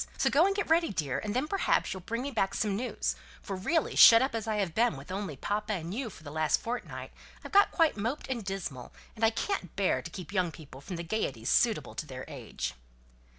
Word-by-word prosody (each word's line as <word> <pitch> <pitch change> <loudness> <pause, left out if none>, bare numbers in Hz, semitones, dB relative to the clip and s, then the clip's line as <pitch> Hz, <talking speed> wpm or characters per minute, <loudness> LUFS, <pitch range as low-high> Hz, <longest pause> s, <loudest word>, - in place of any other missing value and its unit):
So - - +2
go 325 +6 +5
and 395 - 0
get 405 - -1
ready, 330 +1 +3
dear, 145 -8 -1
and 210 +1 -4
then 260 +4 +1
perhaps 395 +4 +1
you'll 190 - -7
bring 230 +7 -3
me 280 - -3
back 195 -6 0
some 210 -2 0
news, 245 +5 -2 0.2
for 195 - -5
really, 310 - 0
shut 230 - +10
up 265 +1 0
as 225 -1 -3
I 220 - 0
have 195 -5 -1
been 230 - +2
with 135 +6 -10
only 190 -7 -4
papa 210 +7 -2
and 170 -2 -4
you 245 +1 -3
for 165 - -14
the 145 - -8
last 155 0 +2
fortnight, 240 +2 -5 0.3
I've - - -7
got 405 -1 +6
quite 325 - +2
moped 230 +8 -2
and 245 -4 -3
dismal, 180 -11 -5 0.2
and 220 - -6
I 225 - +7
can't 225 - -3
bear 190 -10 +1
to 170 - -8
keep 180 +2 -8
young 180 -4 +1
people 140 -4 -12
from 180 - -6
the 170 - -4
gaieties 135 - -2
suitable 230 -2 +2
to 155 - -5
their 130 -1 -7
age." - - -5
205 Hz, 240 wpm, -30 LUFS, 165-240 Hz, 0.3 s, shut